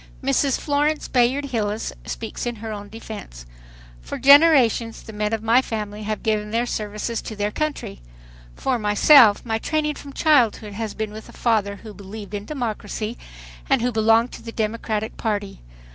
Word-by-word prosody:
Mrs. 275 0 +1
Florence 295 +1 0
Bayard 255 +3 +2
Hilles 220 -5 -2
speaks 230 +1 -5
in 240 - -2
her 220 0 -7
own 205 -1 -8
defense: 205 - -9 0.6
"For - - -6
generations 275 -6 +5
the 220 - -10
men 210 0 -1
of 220 -1 -2
my 230 +3 +5
family 210 -3 -5
have 215 0 -4
given 210 -1 0
their 230 +3 0
services 215 0 -3
to 220 - -7
their 205 0 -1
country. 295 - -4 0.5
For 260 -3 -1
myself, 210 +2 +6
my 225 -1 -1
training 305 +3 -1
from 280 -1 -11
childhood 240 -10 +2
has 220 0 -4
been 215 -1 -3
with 215 +1 -10
a - - -13
father 210 -4 0
who 215 +1 -11
believed 205 +1 -9
in 205 0 -4
democracy 225 -4 -4 0.5
and 270 -4 +3
who 250 - +1
belonged 225 +1 +3
to - - -10
the 230 - -8
Democratic 220 -1 -2
Party. 205 - -3
225 Hz, 170 wpm, -22 LUFS, 210-250 Hz, 0.6 s, myself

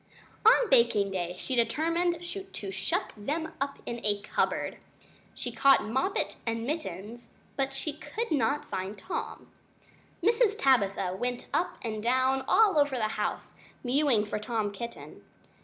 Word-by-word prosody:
On 460 +2 +6
baking 225 -5 +4
day 180 -2 -3
she 260 - -4
determined 335 +8 +1
to 345 - -6
shut 190 0 -2
them 310 +9 -3
up 275 0 -1
in 235 0 -5
a 205 -1 +2
cupboard. - - -1 0.6
She - - -4
caught 275 -1 +5
Moppet 265 - -1
and 230 0 -2
Mittens, 235 - -5 0.3
but 270 0 -1
she 290 +2 -3
could 435 +8 -5
not 285 0 +1
find 190 +3 -4
Tom. 365 - -5 0.7
Mrs. 440 +1 +4
Tabitha 200 -8 +2
went 245 +4 -3
up 355 - 0
and 215 -2 -3
down 260 +3 +2
all 405 -8 +5
over 285 -2 +3
the 220 -3 0
house, - - -3 0.3
mewing 255 -4 +3
for 210 - -3
Tom 215 -1 -1
Kitten. 235 +4 -8
250 Hz, 140 wpm, -29 LUFS, 215-305 Hz, 0.7 s, On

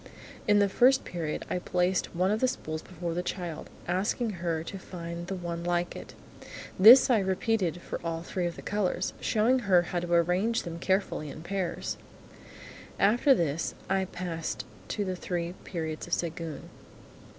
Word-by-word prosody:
In 205 -1 +5
the 200 0 +5
First 255 +7 +4
Period, 165 -3 -3
I 180 - -1
placed 180 0 0
one 185 +3 +2
of 215 - +1
the 255 - +3
spools 155 -10 -4
before 175 -2 -5
the 175 - -1
child, 175 -3 -5 0.2
asking 205 +6 0
her 165 -2 -1
to 195 +3 -7
find 170 -1 -7
the 195 - -3
one 170 -2 -4
like 175 0 0
it. - - -9 0.6
This 240 +7 +9
I 230 - +5
repeated 190 -2 0
for - - -5
all 165 0 -3
three 180 0 -2
of 170 - -5
the - - -10
colours, 200 -2 -1
showing 230 +4 +2
her 190 -6 +4
how 175 0 -2
to 175 0 -5
arrange 180 +8 +2
them 170 -1 -6
carefully 190 -5 0
in 155 - -9
pairs. 185 0 -3 1.0
After 240 +7 +5
this 165 - -1 0.2
I 190 0 +2
passed 175 -3 -4 0.2
to 205 - -2
the 185 -1 -2
Three 175 -1 -3
Periods 160 -3 -4
of 170 - -5
Séguin. 165 -3 -2
180 Hz, 170 wpm, -29 LUFS, 170-195 Hz, 1.0 s, This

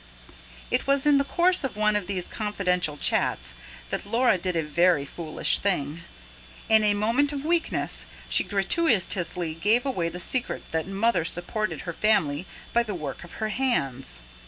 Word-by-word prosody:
It - - 0
was 275 0 +2
in 290 -1 +5
the - - +2
course 350 +5 +2
of 260 -6 -4
one 215 0 +2
of 205 -4 -1
these 190 -3 -2
confidential 180 -7 -1
chats - - +1 0.4
that - - -2
Laura 230 -1 +2
did 180 0 -2
a 165 - +1
very 165 0 +2
foolish 155 +2 +1
thing. 160 -6 -1 0.7
In 220 -1 +5
a 205 -1 +3
moment 235 +8 +1
of 285 0 -5
weakness, 335 0 +1 0.2
she - - +3
gratuitously 195 - +1
gave 210 - +2
away 180 -12 -1
the 180 +2 -7
secret 245 +7 -2
that 160 +1 -1
Mother 195 -1 +1
supported 175 +6 -3
her 170 - -5
family 165 -6 +1 0.3
by 235 - +4
the 215 -4 -4
work 150 -5 -6
of 175 - -12
her 220 -1 -3
hands. 135 - -2
200 Hz, 165 wpm, -26 LUFS, 170-235 Hz, 0.7 s, in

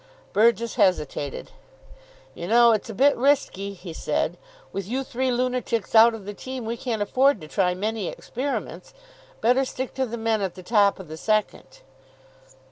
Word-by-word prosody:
Burgess 230 +2 +2
hesitated. 150 -6 0 0.8
"You 170 - -7
know, 235 +2 +6
it's 220 0 -1
a - - -5
bit 280 +6 +4
risky," 235 -7 0
he 180 -2 -9
said. - - -1 0.4
"With 195 -1 -4
you 260 +5 -2
three 260 0 -2
lunatics 250 -3 -1
out 225 +1 +7
of 210 -3 -10
the 205 - -6
team 255 +3 -7
we 230 +1 -2
can't 230 -3 -2
afford 260 +3 +3
to 155 - -9
try 180 +1 +1
many 210 0 -2
experiments. 275 - -5 0.5
Better 250 +3 +3
stick 260 0 -5
to 265 -1 -1
the 235 +1 -5
men 225 -1 0
at 190 -3 -3
the 185 - -10
top 205 -1 +3
of 190 - -9
the 155 +1 -8
second." 215 +4 -2
225 Hz, 170 wpm, -24 LUFS, 195-250 Hz, 0.8 s, out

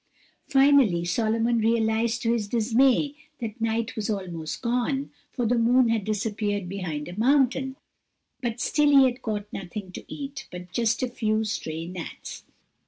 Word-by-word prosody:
Finally 270 - +4
Solomon 225 +5 +1
realized 225 0 +1
to 230 0 +2
his 220 -3 -1
dismay 250 +6 +2 0.2
that 225 0 -6
night 230 +2 -1
was 215 -2 -3
almost 170 -7 -4
gone, 250 +4 0 0.2
for 245 - -2
the 235 +1 +2
moon 240 +1 +4
had 225 -3 0
disappeared 205 -2 -1
behind 175 -6 -4
a 175 +4 -7
mountain, 265 +1 +2 0.7
and 240 -2 -3
still 295 +3 +2
he 280 -2 +7
had 250 0 -1
caught 210 -2 -3
nothing 190 0 -6
to - - -8
eat 280 -1 -6
but 180 0 -9
just 235 +2 +1
a - - +1
few 220 -3 0
stray 165 -6 -4
gnats. 175 -1 -8
225 Hz, 155 wpm, -26 LUFS, 205-245 Hz, 0.7 s, he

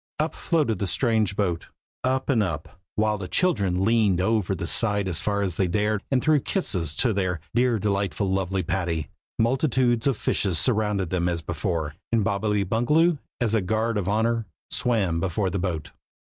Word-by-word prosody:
Up 155 +2 0
floated 145 - 0
the 100 - -1
strange 110 +1 +1
boat, 90 -5 -1 0.4
up 130 +1 0
and 125 -6 +3
up, 85 -2 -4 0.2
while 105 -1 +1
the 95 - -5
children 100 - +1
leaned 110 -5 +3
over 100 -1 +1
the 90 -1 -4
side 105 +1 +2
as 85 -3 +1
far 100 -1 0
as 90 -4 -2
they 95 - +2
dared, 105 +3 0
and 130 -2 +1
threw 155 -1 +4
kisses 90 - -2
to 120 - +2
their 95 -3 -1
"dear 120 0 +3
delightful 100 0 -1
lovely 95 0 0
Patty!" 85 -2 -2 0.3
Multitudes 120 0 +2
of 135 -5 +1
fishes 95 -5 0
surrounded 105 -6 +1
them 90 -1 +1
as 85 -2 -2
before, 80 -2 -2 0.2
and 115 -2 +2
Bobbily 100 +1 0
Bungaloo, 150 - +2 0.2
as 115 -4 0
a 110 - +3
guard 110 +5 0
of 100 -3 -1
honor, 115 +1 +1 0.2
swam 100 -9 +1
before 95 +2 -1
the 100 - -1
boat. 85 -5 -3
105 Hz, 175 wpm, -25 LUFS, 90-115 Hz, 0.4 s, threw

